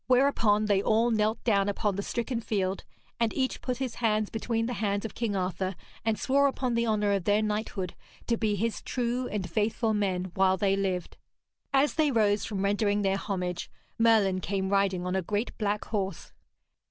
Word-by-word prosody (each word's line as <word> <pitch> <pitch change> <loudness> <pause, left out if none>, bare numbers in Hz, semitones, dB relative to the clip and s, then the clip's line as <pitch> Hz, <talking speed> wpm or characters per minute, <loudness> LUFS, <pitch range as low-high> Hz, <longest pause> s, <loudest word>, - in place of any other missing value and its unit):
Whereupon 245 -5 +3
they 200 -2 +3
all 225 +3 +2
knelt 220 0 +1
down 200 -3 +2
upon 205 0 -1
the 200 - -2
stricken 235 +3 -2
field, 195 -3 -1 0.4
and 230 -2 +2
each 260 -1 -1
put 250 -1 -2
his 260 -2 -3
hands 215 -2 +1
between 225 0 -1
the 245 - -2
hands 200 0 0
of 220 - -5
King 225 -4 -2
Arthur, 185 0 -2 0.3
and 220 -1 +1
swore 280 +1 +3
upon 260 -2 -1
the 235 0 +1
honour 210 -2 +2
of 195 -3 0
their 205 +1 +3
knighthood 210 -4 -2 0.3
to 235 - +1
be 215 -2 0
his 225 +3 -2
true 250 0 -2
and 200 -4 -3
faithful 220 +4 0
men 185 -3 -1
while 190 0 +3
they 195 +1 +2
lived. 190 -3 -2 0.5
As 275 +1 +3
they 310 -2 +2
rose 210 -5 +2
from 200 -3 -3
rendering 205 +1 +1
their 195 0 +2
homage, 180 -3 -3 0.3
Merlin 215 -5 +4
came 190 +1 -1
riding 195 -2 +1
on 180 +1 -1
a 190 - +1
great 205 +6 -2
black 210 -1 -1
horse. 195 -5 -3
210 Hz, 190 wpm, -28 LUFS, 195-230 Hz, 0.5 s, Merlin